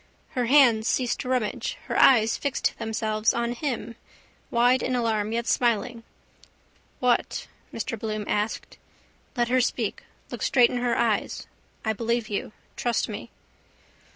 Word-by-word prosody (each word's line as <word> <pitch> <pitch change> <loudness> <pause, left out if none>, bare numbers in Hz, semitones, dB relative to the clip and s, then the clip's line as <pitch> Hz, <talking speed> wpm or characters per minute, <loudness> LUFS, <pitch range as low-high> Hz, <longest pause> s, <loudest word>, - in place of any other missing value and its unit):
Her 250 -2 -1
hand 240 -5 +5
ceased 250 -2 0
to 250 - -4
rummage. 255 - -1
Her - - -4
eyes 225 -4 +5
fixed 280 -2 -1
themselves 220 -1 0
on 235 0 0
him, 240 -3 -4 0.5
wide 245 +2 +3
in 255 - -1
alarm, 220 -3 0
yet 235 +1 -1
smiling. 235 -1 0 1.0
—What? 250 -1 +1 0.3
Mr 230 -4 -4
Bloom 215 -1 -3
asked. 210 +1 -2 0.6
Let 240 0 +1
her 255 +1 +3
speak. - - -1 0.3
Look - - -6
straight 245 -2 +4
in 250 - -2
her 245 -1 0
eyes. 225 -3 0 0.4
I 220 - +1
believe 230 +1 -1
you. 205 0 -3 0.2
Trust 240 -1 -1
me. 215 +2 -6
235 Hz, 140 wpm, -26 LUFS, 220-245 Hz, 1.0 s, hand